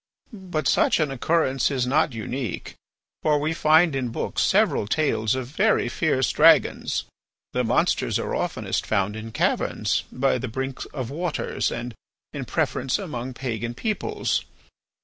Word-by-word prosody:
But 185 -7 -3
such - - +3
an 150 -3 +1
occurrence 135 -1 +1
is 130 -3 0
not 145 +4 +2
unique, 115 0 -4 0.5
for 150 -1 +2
we 155 +2 0
find 160 -1 +4
in 130 -2 -1
books - - -2
several 100 - +2
tales 110 -5 +1
of 130 -1 -3
very 165 - +1
fierce 135 -2 +1
dragons. - - +4 0.5
The - - +1
monsters - - +1
are - - -3
oftenest - - -2
found 100 -1 0
in 110 +1 -7
caverns, - - 0
by 130 0 +1
the 125 - -4
brinks 130 +3 -4
of 130 -4 -6
waters, 170 +2 -2
and, 120 0 -5 0.4
in - - -4
preference, 130 0 0
among 130 - -5
pagan 120 -2 -4
peoples. 215 - -1
130 Hz, 145 wpm, -24 LUFS, 120-155 Hz, 0.5 s, find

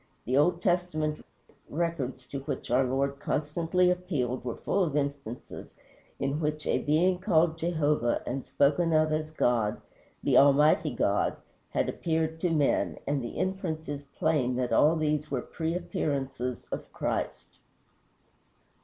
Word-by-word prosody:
The 125 - 0
Old 170 +5 +3
Testament 175 -4 0 0.5
records 140 -6 -2
to 140 - -4
which 135 - -5
our 130 +2 +4
Lord 140 +2 -1
constantly 165 +5 +1
appealed 150 -10 -2
were 120 -2 -3
full 195 - 0
of 155 -5 -2
instances 140 -5 -5 0.4
in 140 +2 -1
which 150 -1 -2
a - - +1
being 180 +5 +2
called 170 -4 +3
Jehovah, 150 -7 +1
and 130 +1 -3
spoken 155 +4 +2
of 155 0 +3
as 155 0 -1
God, 120 -8 +1 0.4
the - - +5
Almighty 150 +3 +5
God, 105 -5 +1 0.3
had - - 0
appeared 160 -1 -1
to 180 - +2
men, 150 -4 +1
and 140 -2 -1
the 120 - -6
inference 180 -4 -2
is 145 -1 -4 0.2
plain 140 -6 +1
that 125 -1 -1
all 155 +3 +5
these 150 -1 0
were 135 - -1
pre 165 0 -3
appearances 135 -7 -2
of - - -5
Christ. - - -3
150 Hz, 145 wpm, -29 LUFS, 135-165 Hz, 0.5 s, the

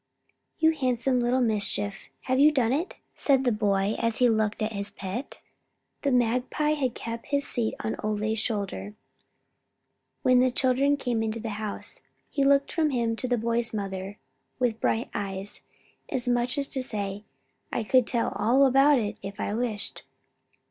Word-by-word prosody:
"You 320 0 +4
handsome 255 -3 0
little 245 +2 +2
mischief, 205 -3 -1
have 260 0 0
you 300 +2 +7
done 255 -5 +2
it?" 325 +7 -2 0.2
said 270 -2 +2
the 245 - +2
boy, 205 -1 +1
as 230 -1 0
he 250 - +5
looked 220 -1 +1
at 220 +1 -2
his 200 0 -4
pet. 200 +8 -6 0.6
The 280 - +1
magpie 250 +5 +1
had 265 -5 -1
kept 230 0 -6
his 280 0 0
seat 230 -3 -1
on 220 - -2
Ole's 215 +1 -1
shoulder 210 -2 -3 1.3
when 255 -2 +5
the 255 +1 +4
children 265 +3 +2
came 245 -4 -1
into 225 +1 -2
the 225 -1 -4
house. 210 -2 -4 0.3
He 280 - +1
looked 280 0 +3
from 320 -3 +1
him 235 -4 0
to 255 - -2
the 245 -1 +1
boy's 230 0 0
mother 195 0 -4 0.4
with 240 -3 0
bright 225 +2 0
eyes, 195 -1 -5 0.5
as 250 -1 -2
much 245 +2 +1
as 280 -1 0
to 265 - -3
say, 205 -4 -3 0.5
"I 230 - -1
could 250 +2 +3
tell 235 -2 +1
all 245 +7 +4
about 275 +2 +5
it, 210 -4 -2
if 200 +1 -8
I 205 - -2
wished." 220 -3 +2
235 Hz, 170 wpm, -27 LUFS, 215-260 Hz, 1.3 s, you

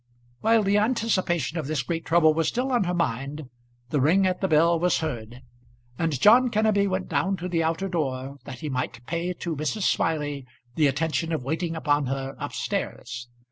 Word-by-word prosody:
While 225 0 +3
the 200 +1 +3
anticipation 185 - 0
of 150 - -4
this 150 -3 -1
great 165 +5 -3
trouble 160 -2 +4
was 165 +1 0
still 255 +2 -1
on 240 -6 +2
her 175 - -1
mind, 140 -2 -2 0.4
the 145 - +1
ring 180 +8 +4
at 185 -1 0
the 190 - +2
bell 165 +1 +4
was 180 +1 +2
heard, 120 -5 -5 0.6
and 160 -5 0
John 240 - +6
Kenneby 215 -2 +2
went 185 0 -2
down 195 0 0
to 180 +1 -4
the 170 -2 0
outer 165 +4 0
door 140 -5 -3
that 130 -3 -8
he 155 - -4
might 125 -2 -4
pay 170 +4 -2
to 170 -2 -4
Mrs. 155 +8 -2
Smiley 145 -7 0 0.3
the 150 +2 +3
attention 160 +4 -1
of 155 -5 -2
waiting 165 +4 -2
upon 145 -3 +1
her 135 0 -3
up - - -5
stairs. 120 0 -4
165 Hz, 190 wpm, -25 LUFS, 140-185 Hz, 0.6 s, John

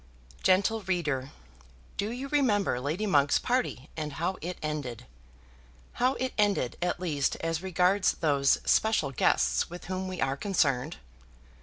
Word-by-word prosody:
Gentle 200 +4 +3
reader, 150 -8 -1 0.7
do 205 - -2
you 250 +4 -5
remember 215 - +2
Lady 155 +11 -2
Monk's 145 -7 +3
party, 245 - -1
and 150 -2 -4
how 175 +5 -2
it 175 +2 -5
ended, 145 - -4 1.0
how 255 +2 +3
it 260 0 -2
ended, 200 -12 +2
at 175 0 0
least 150 -6 0
as 165 0 -1
regards 185 +1 +2
those 140 -4 +2
special 220 -11 +2
guests 65 - +2
with 175 +1 -9
whom 185 +1 -3
we 185 -2 -5
are 135 0 +1
concerned? 150 -5 0
175 Hz, 140 wpm, -29 LUFS, 145-200 Hz, 1.0 s, Gentle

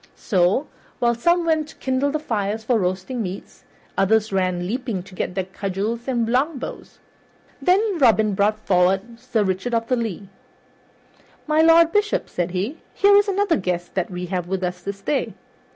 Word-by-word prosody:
So, 185 +8 +1 0.3
while 235 -1 +2
some 340 +9 +2
went 315 -2 +1
to - - -14
kindle 260 +2 0
the 305 - -1
fires 220 -6 -2
for 230 0 +2
roasting 185 +6 -2
meats, 190 -1 -7 0.3
others 215 +1 +2
ran 185 -2 0
leaping 225 -2 -3
to 190 - -15
get 180 - -3
their 190 - 0
cudgels 200 +5 -4
and 240 -3 0
longbows. 265 +4 -2 0.6
Then 390 0 +2
Robin 220 -5 +4
brought 205 +2 +2
forward 190 +5 +1
Sir 245 -3 0
Richard 190 +5 -1
of 230 0 -1
the 255 - +3
Lea. 215 -5 -4 1.2
"My 310 +1 +3
Lord 330 0 +6
Bishop," 420 0 0
said 175 0 -2
he, 195 - -3 0.2
"here 405 0 +5
is 410 +1 +5
another 400 -2 +1
guest 180 -2 -3
that 185 -2 -1
we 180 -1 -5
have 180 -1 -3
with 190 0 -2
us 180 0 -3
this 200 +2 -6
day. 275 +7 -1
220 Hz, 170 wpm, -22 LUFS, 190-275 Hz, 1.2 s, Lord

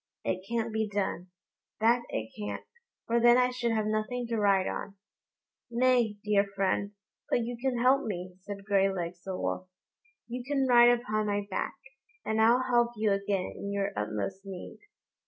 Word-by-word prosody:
It 185 0 -1
can't 230 -1 -1
be 220 -1 0
done, 200 -3 -2 0.5
that 235 +2 +4
it 110 0 -4
can't, 105 -1 -5 0.4
for 235 +1 +2
then 240 +1 +6
I 250 0 +3
should 245 -2 -1
have 220 -1 +1
nothing 215 +3 -1
to 230 - 0
ride 195 -2 +3
on." 200 - -4 0.7
"Nay, 240 -3 +2
dear 210 -1 +3
friend, 200 +1 0 0.4
but - - +2
you 240 +1 -3
can 250 +1 -1
help 260 +3 +4
me," 185 -3 -4
said 200 0 -8
Graylegs 190 -4 +1
the 190 -1 -5
wolf; 185 - -3 0.6
"you 245 +1 -5
can 275 +1 0
ride 240 -1 +7
upon 215 -3 +1
my 205 0 -1
back, - - -2 0.5
and 220 0 +1
I'll 235 +3 +5
help 240 -2 +2
you 215 -1 +1
again 195 -1 -1
in 200 - -5
your 200 0 -1
utmost 110 - -3
need." 195 -2 -8
215 Hz, 170 wpm, -29 LUFS, 195-240 Hz, 0.7 s, ride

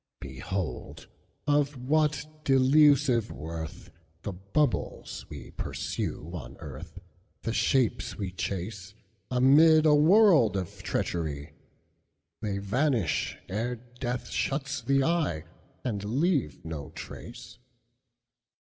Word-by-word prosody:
Behold 75 +7 -5 0.4
of 145 -1 +2
what 150 +3 +1 0.2
delusive 135 -3 +5
worthThe 80 +3 -8 0.2
bubbles 150 -2 -1
we 70 -4 -9
pursue 80 - -4
on 70 -9 -7
earth, 80 +1 -9 0.5
The 115 - -1
shapes 130 -1 +1
we 100 -3 -3
chaseAmid 110 - +2
a 155 - +6
world 155 - +6
of 90 -3 -5
treachery! 75 -3 -2 0.9
They 100 -3 -2
vanish 110 - 0
ere 115 +6 -2
death 125 +1 -5
shuts 140 0 -1
the 135 +3 +2
eye, 155 - 0 0.4
And 105 -6 -2
leave 135 - 0
no 80 -4 -5
trace. - - -9
115 Hz, 95 wpm, -28 LUFS, 90-145 Hz, 0.9 s, a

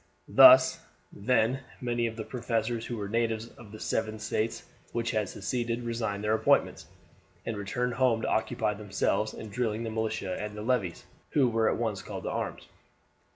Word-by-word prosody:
Thus, - - +8 0.3
then, 120 +3 +1 0.2
many 120 -1 0
of 115 - -5
the 110 - -3
professors 115 -1 -2
who 120 - -4
were 100 -2 -4
natives 115 +1 -1
of 110 -4 -14
the 110 - -10
seven 110 0 -1
States 110 +1 -2 0.3
which 115 0 -1
had 110 -4 -1
seceded 115 +4 -2
resigned 115 -3 -2
their 105 +1 +2
appointments, 110 - +2 0.6
and 115 - -2
returned 110 +5 -2
home 120 -3 +2
to - - 0
occupy 110 -1 0
themselves 105 +1 -1
in 110 - -8
drilling 115 0 -1
the 115 - -3
militia 110 -4 -2
and 105 0 -5
the 105 - -5
levies, 110 -8 -1 0.3
who 135 -4 +4
were 115 -1 +2
at - - 0
once 110 -4 -2
called - - -7
to - - -3
arms. - - -4
110 Hz, 175 wpm, -29 LUFS, 105-120 Hz, 0.6 s, Thus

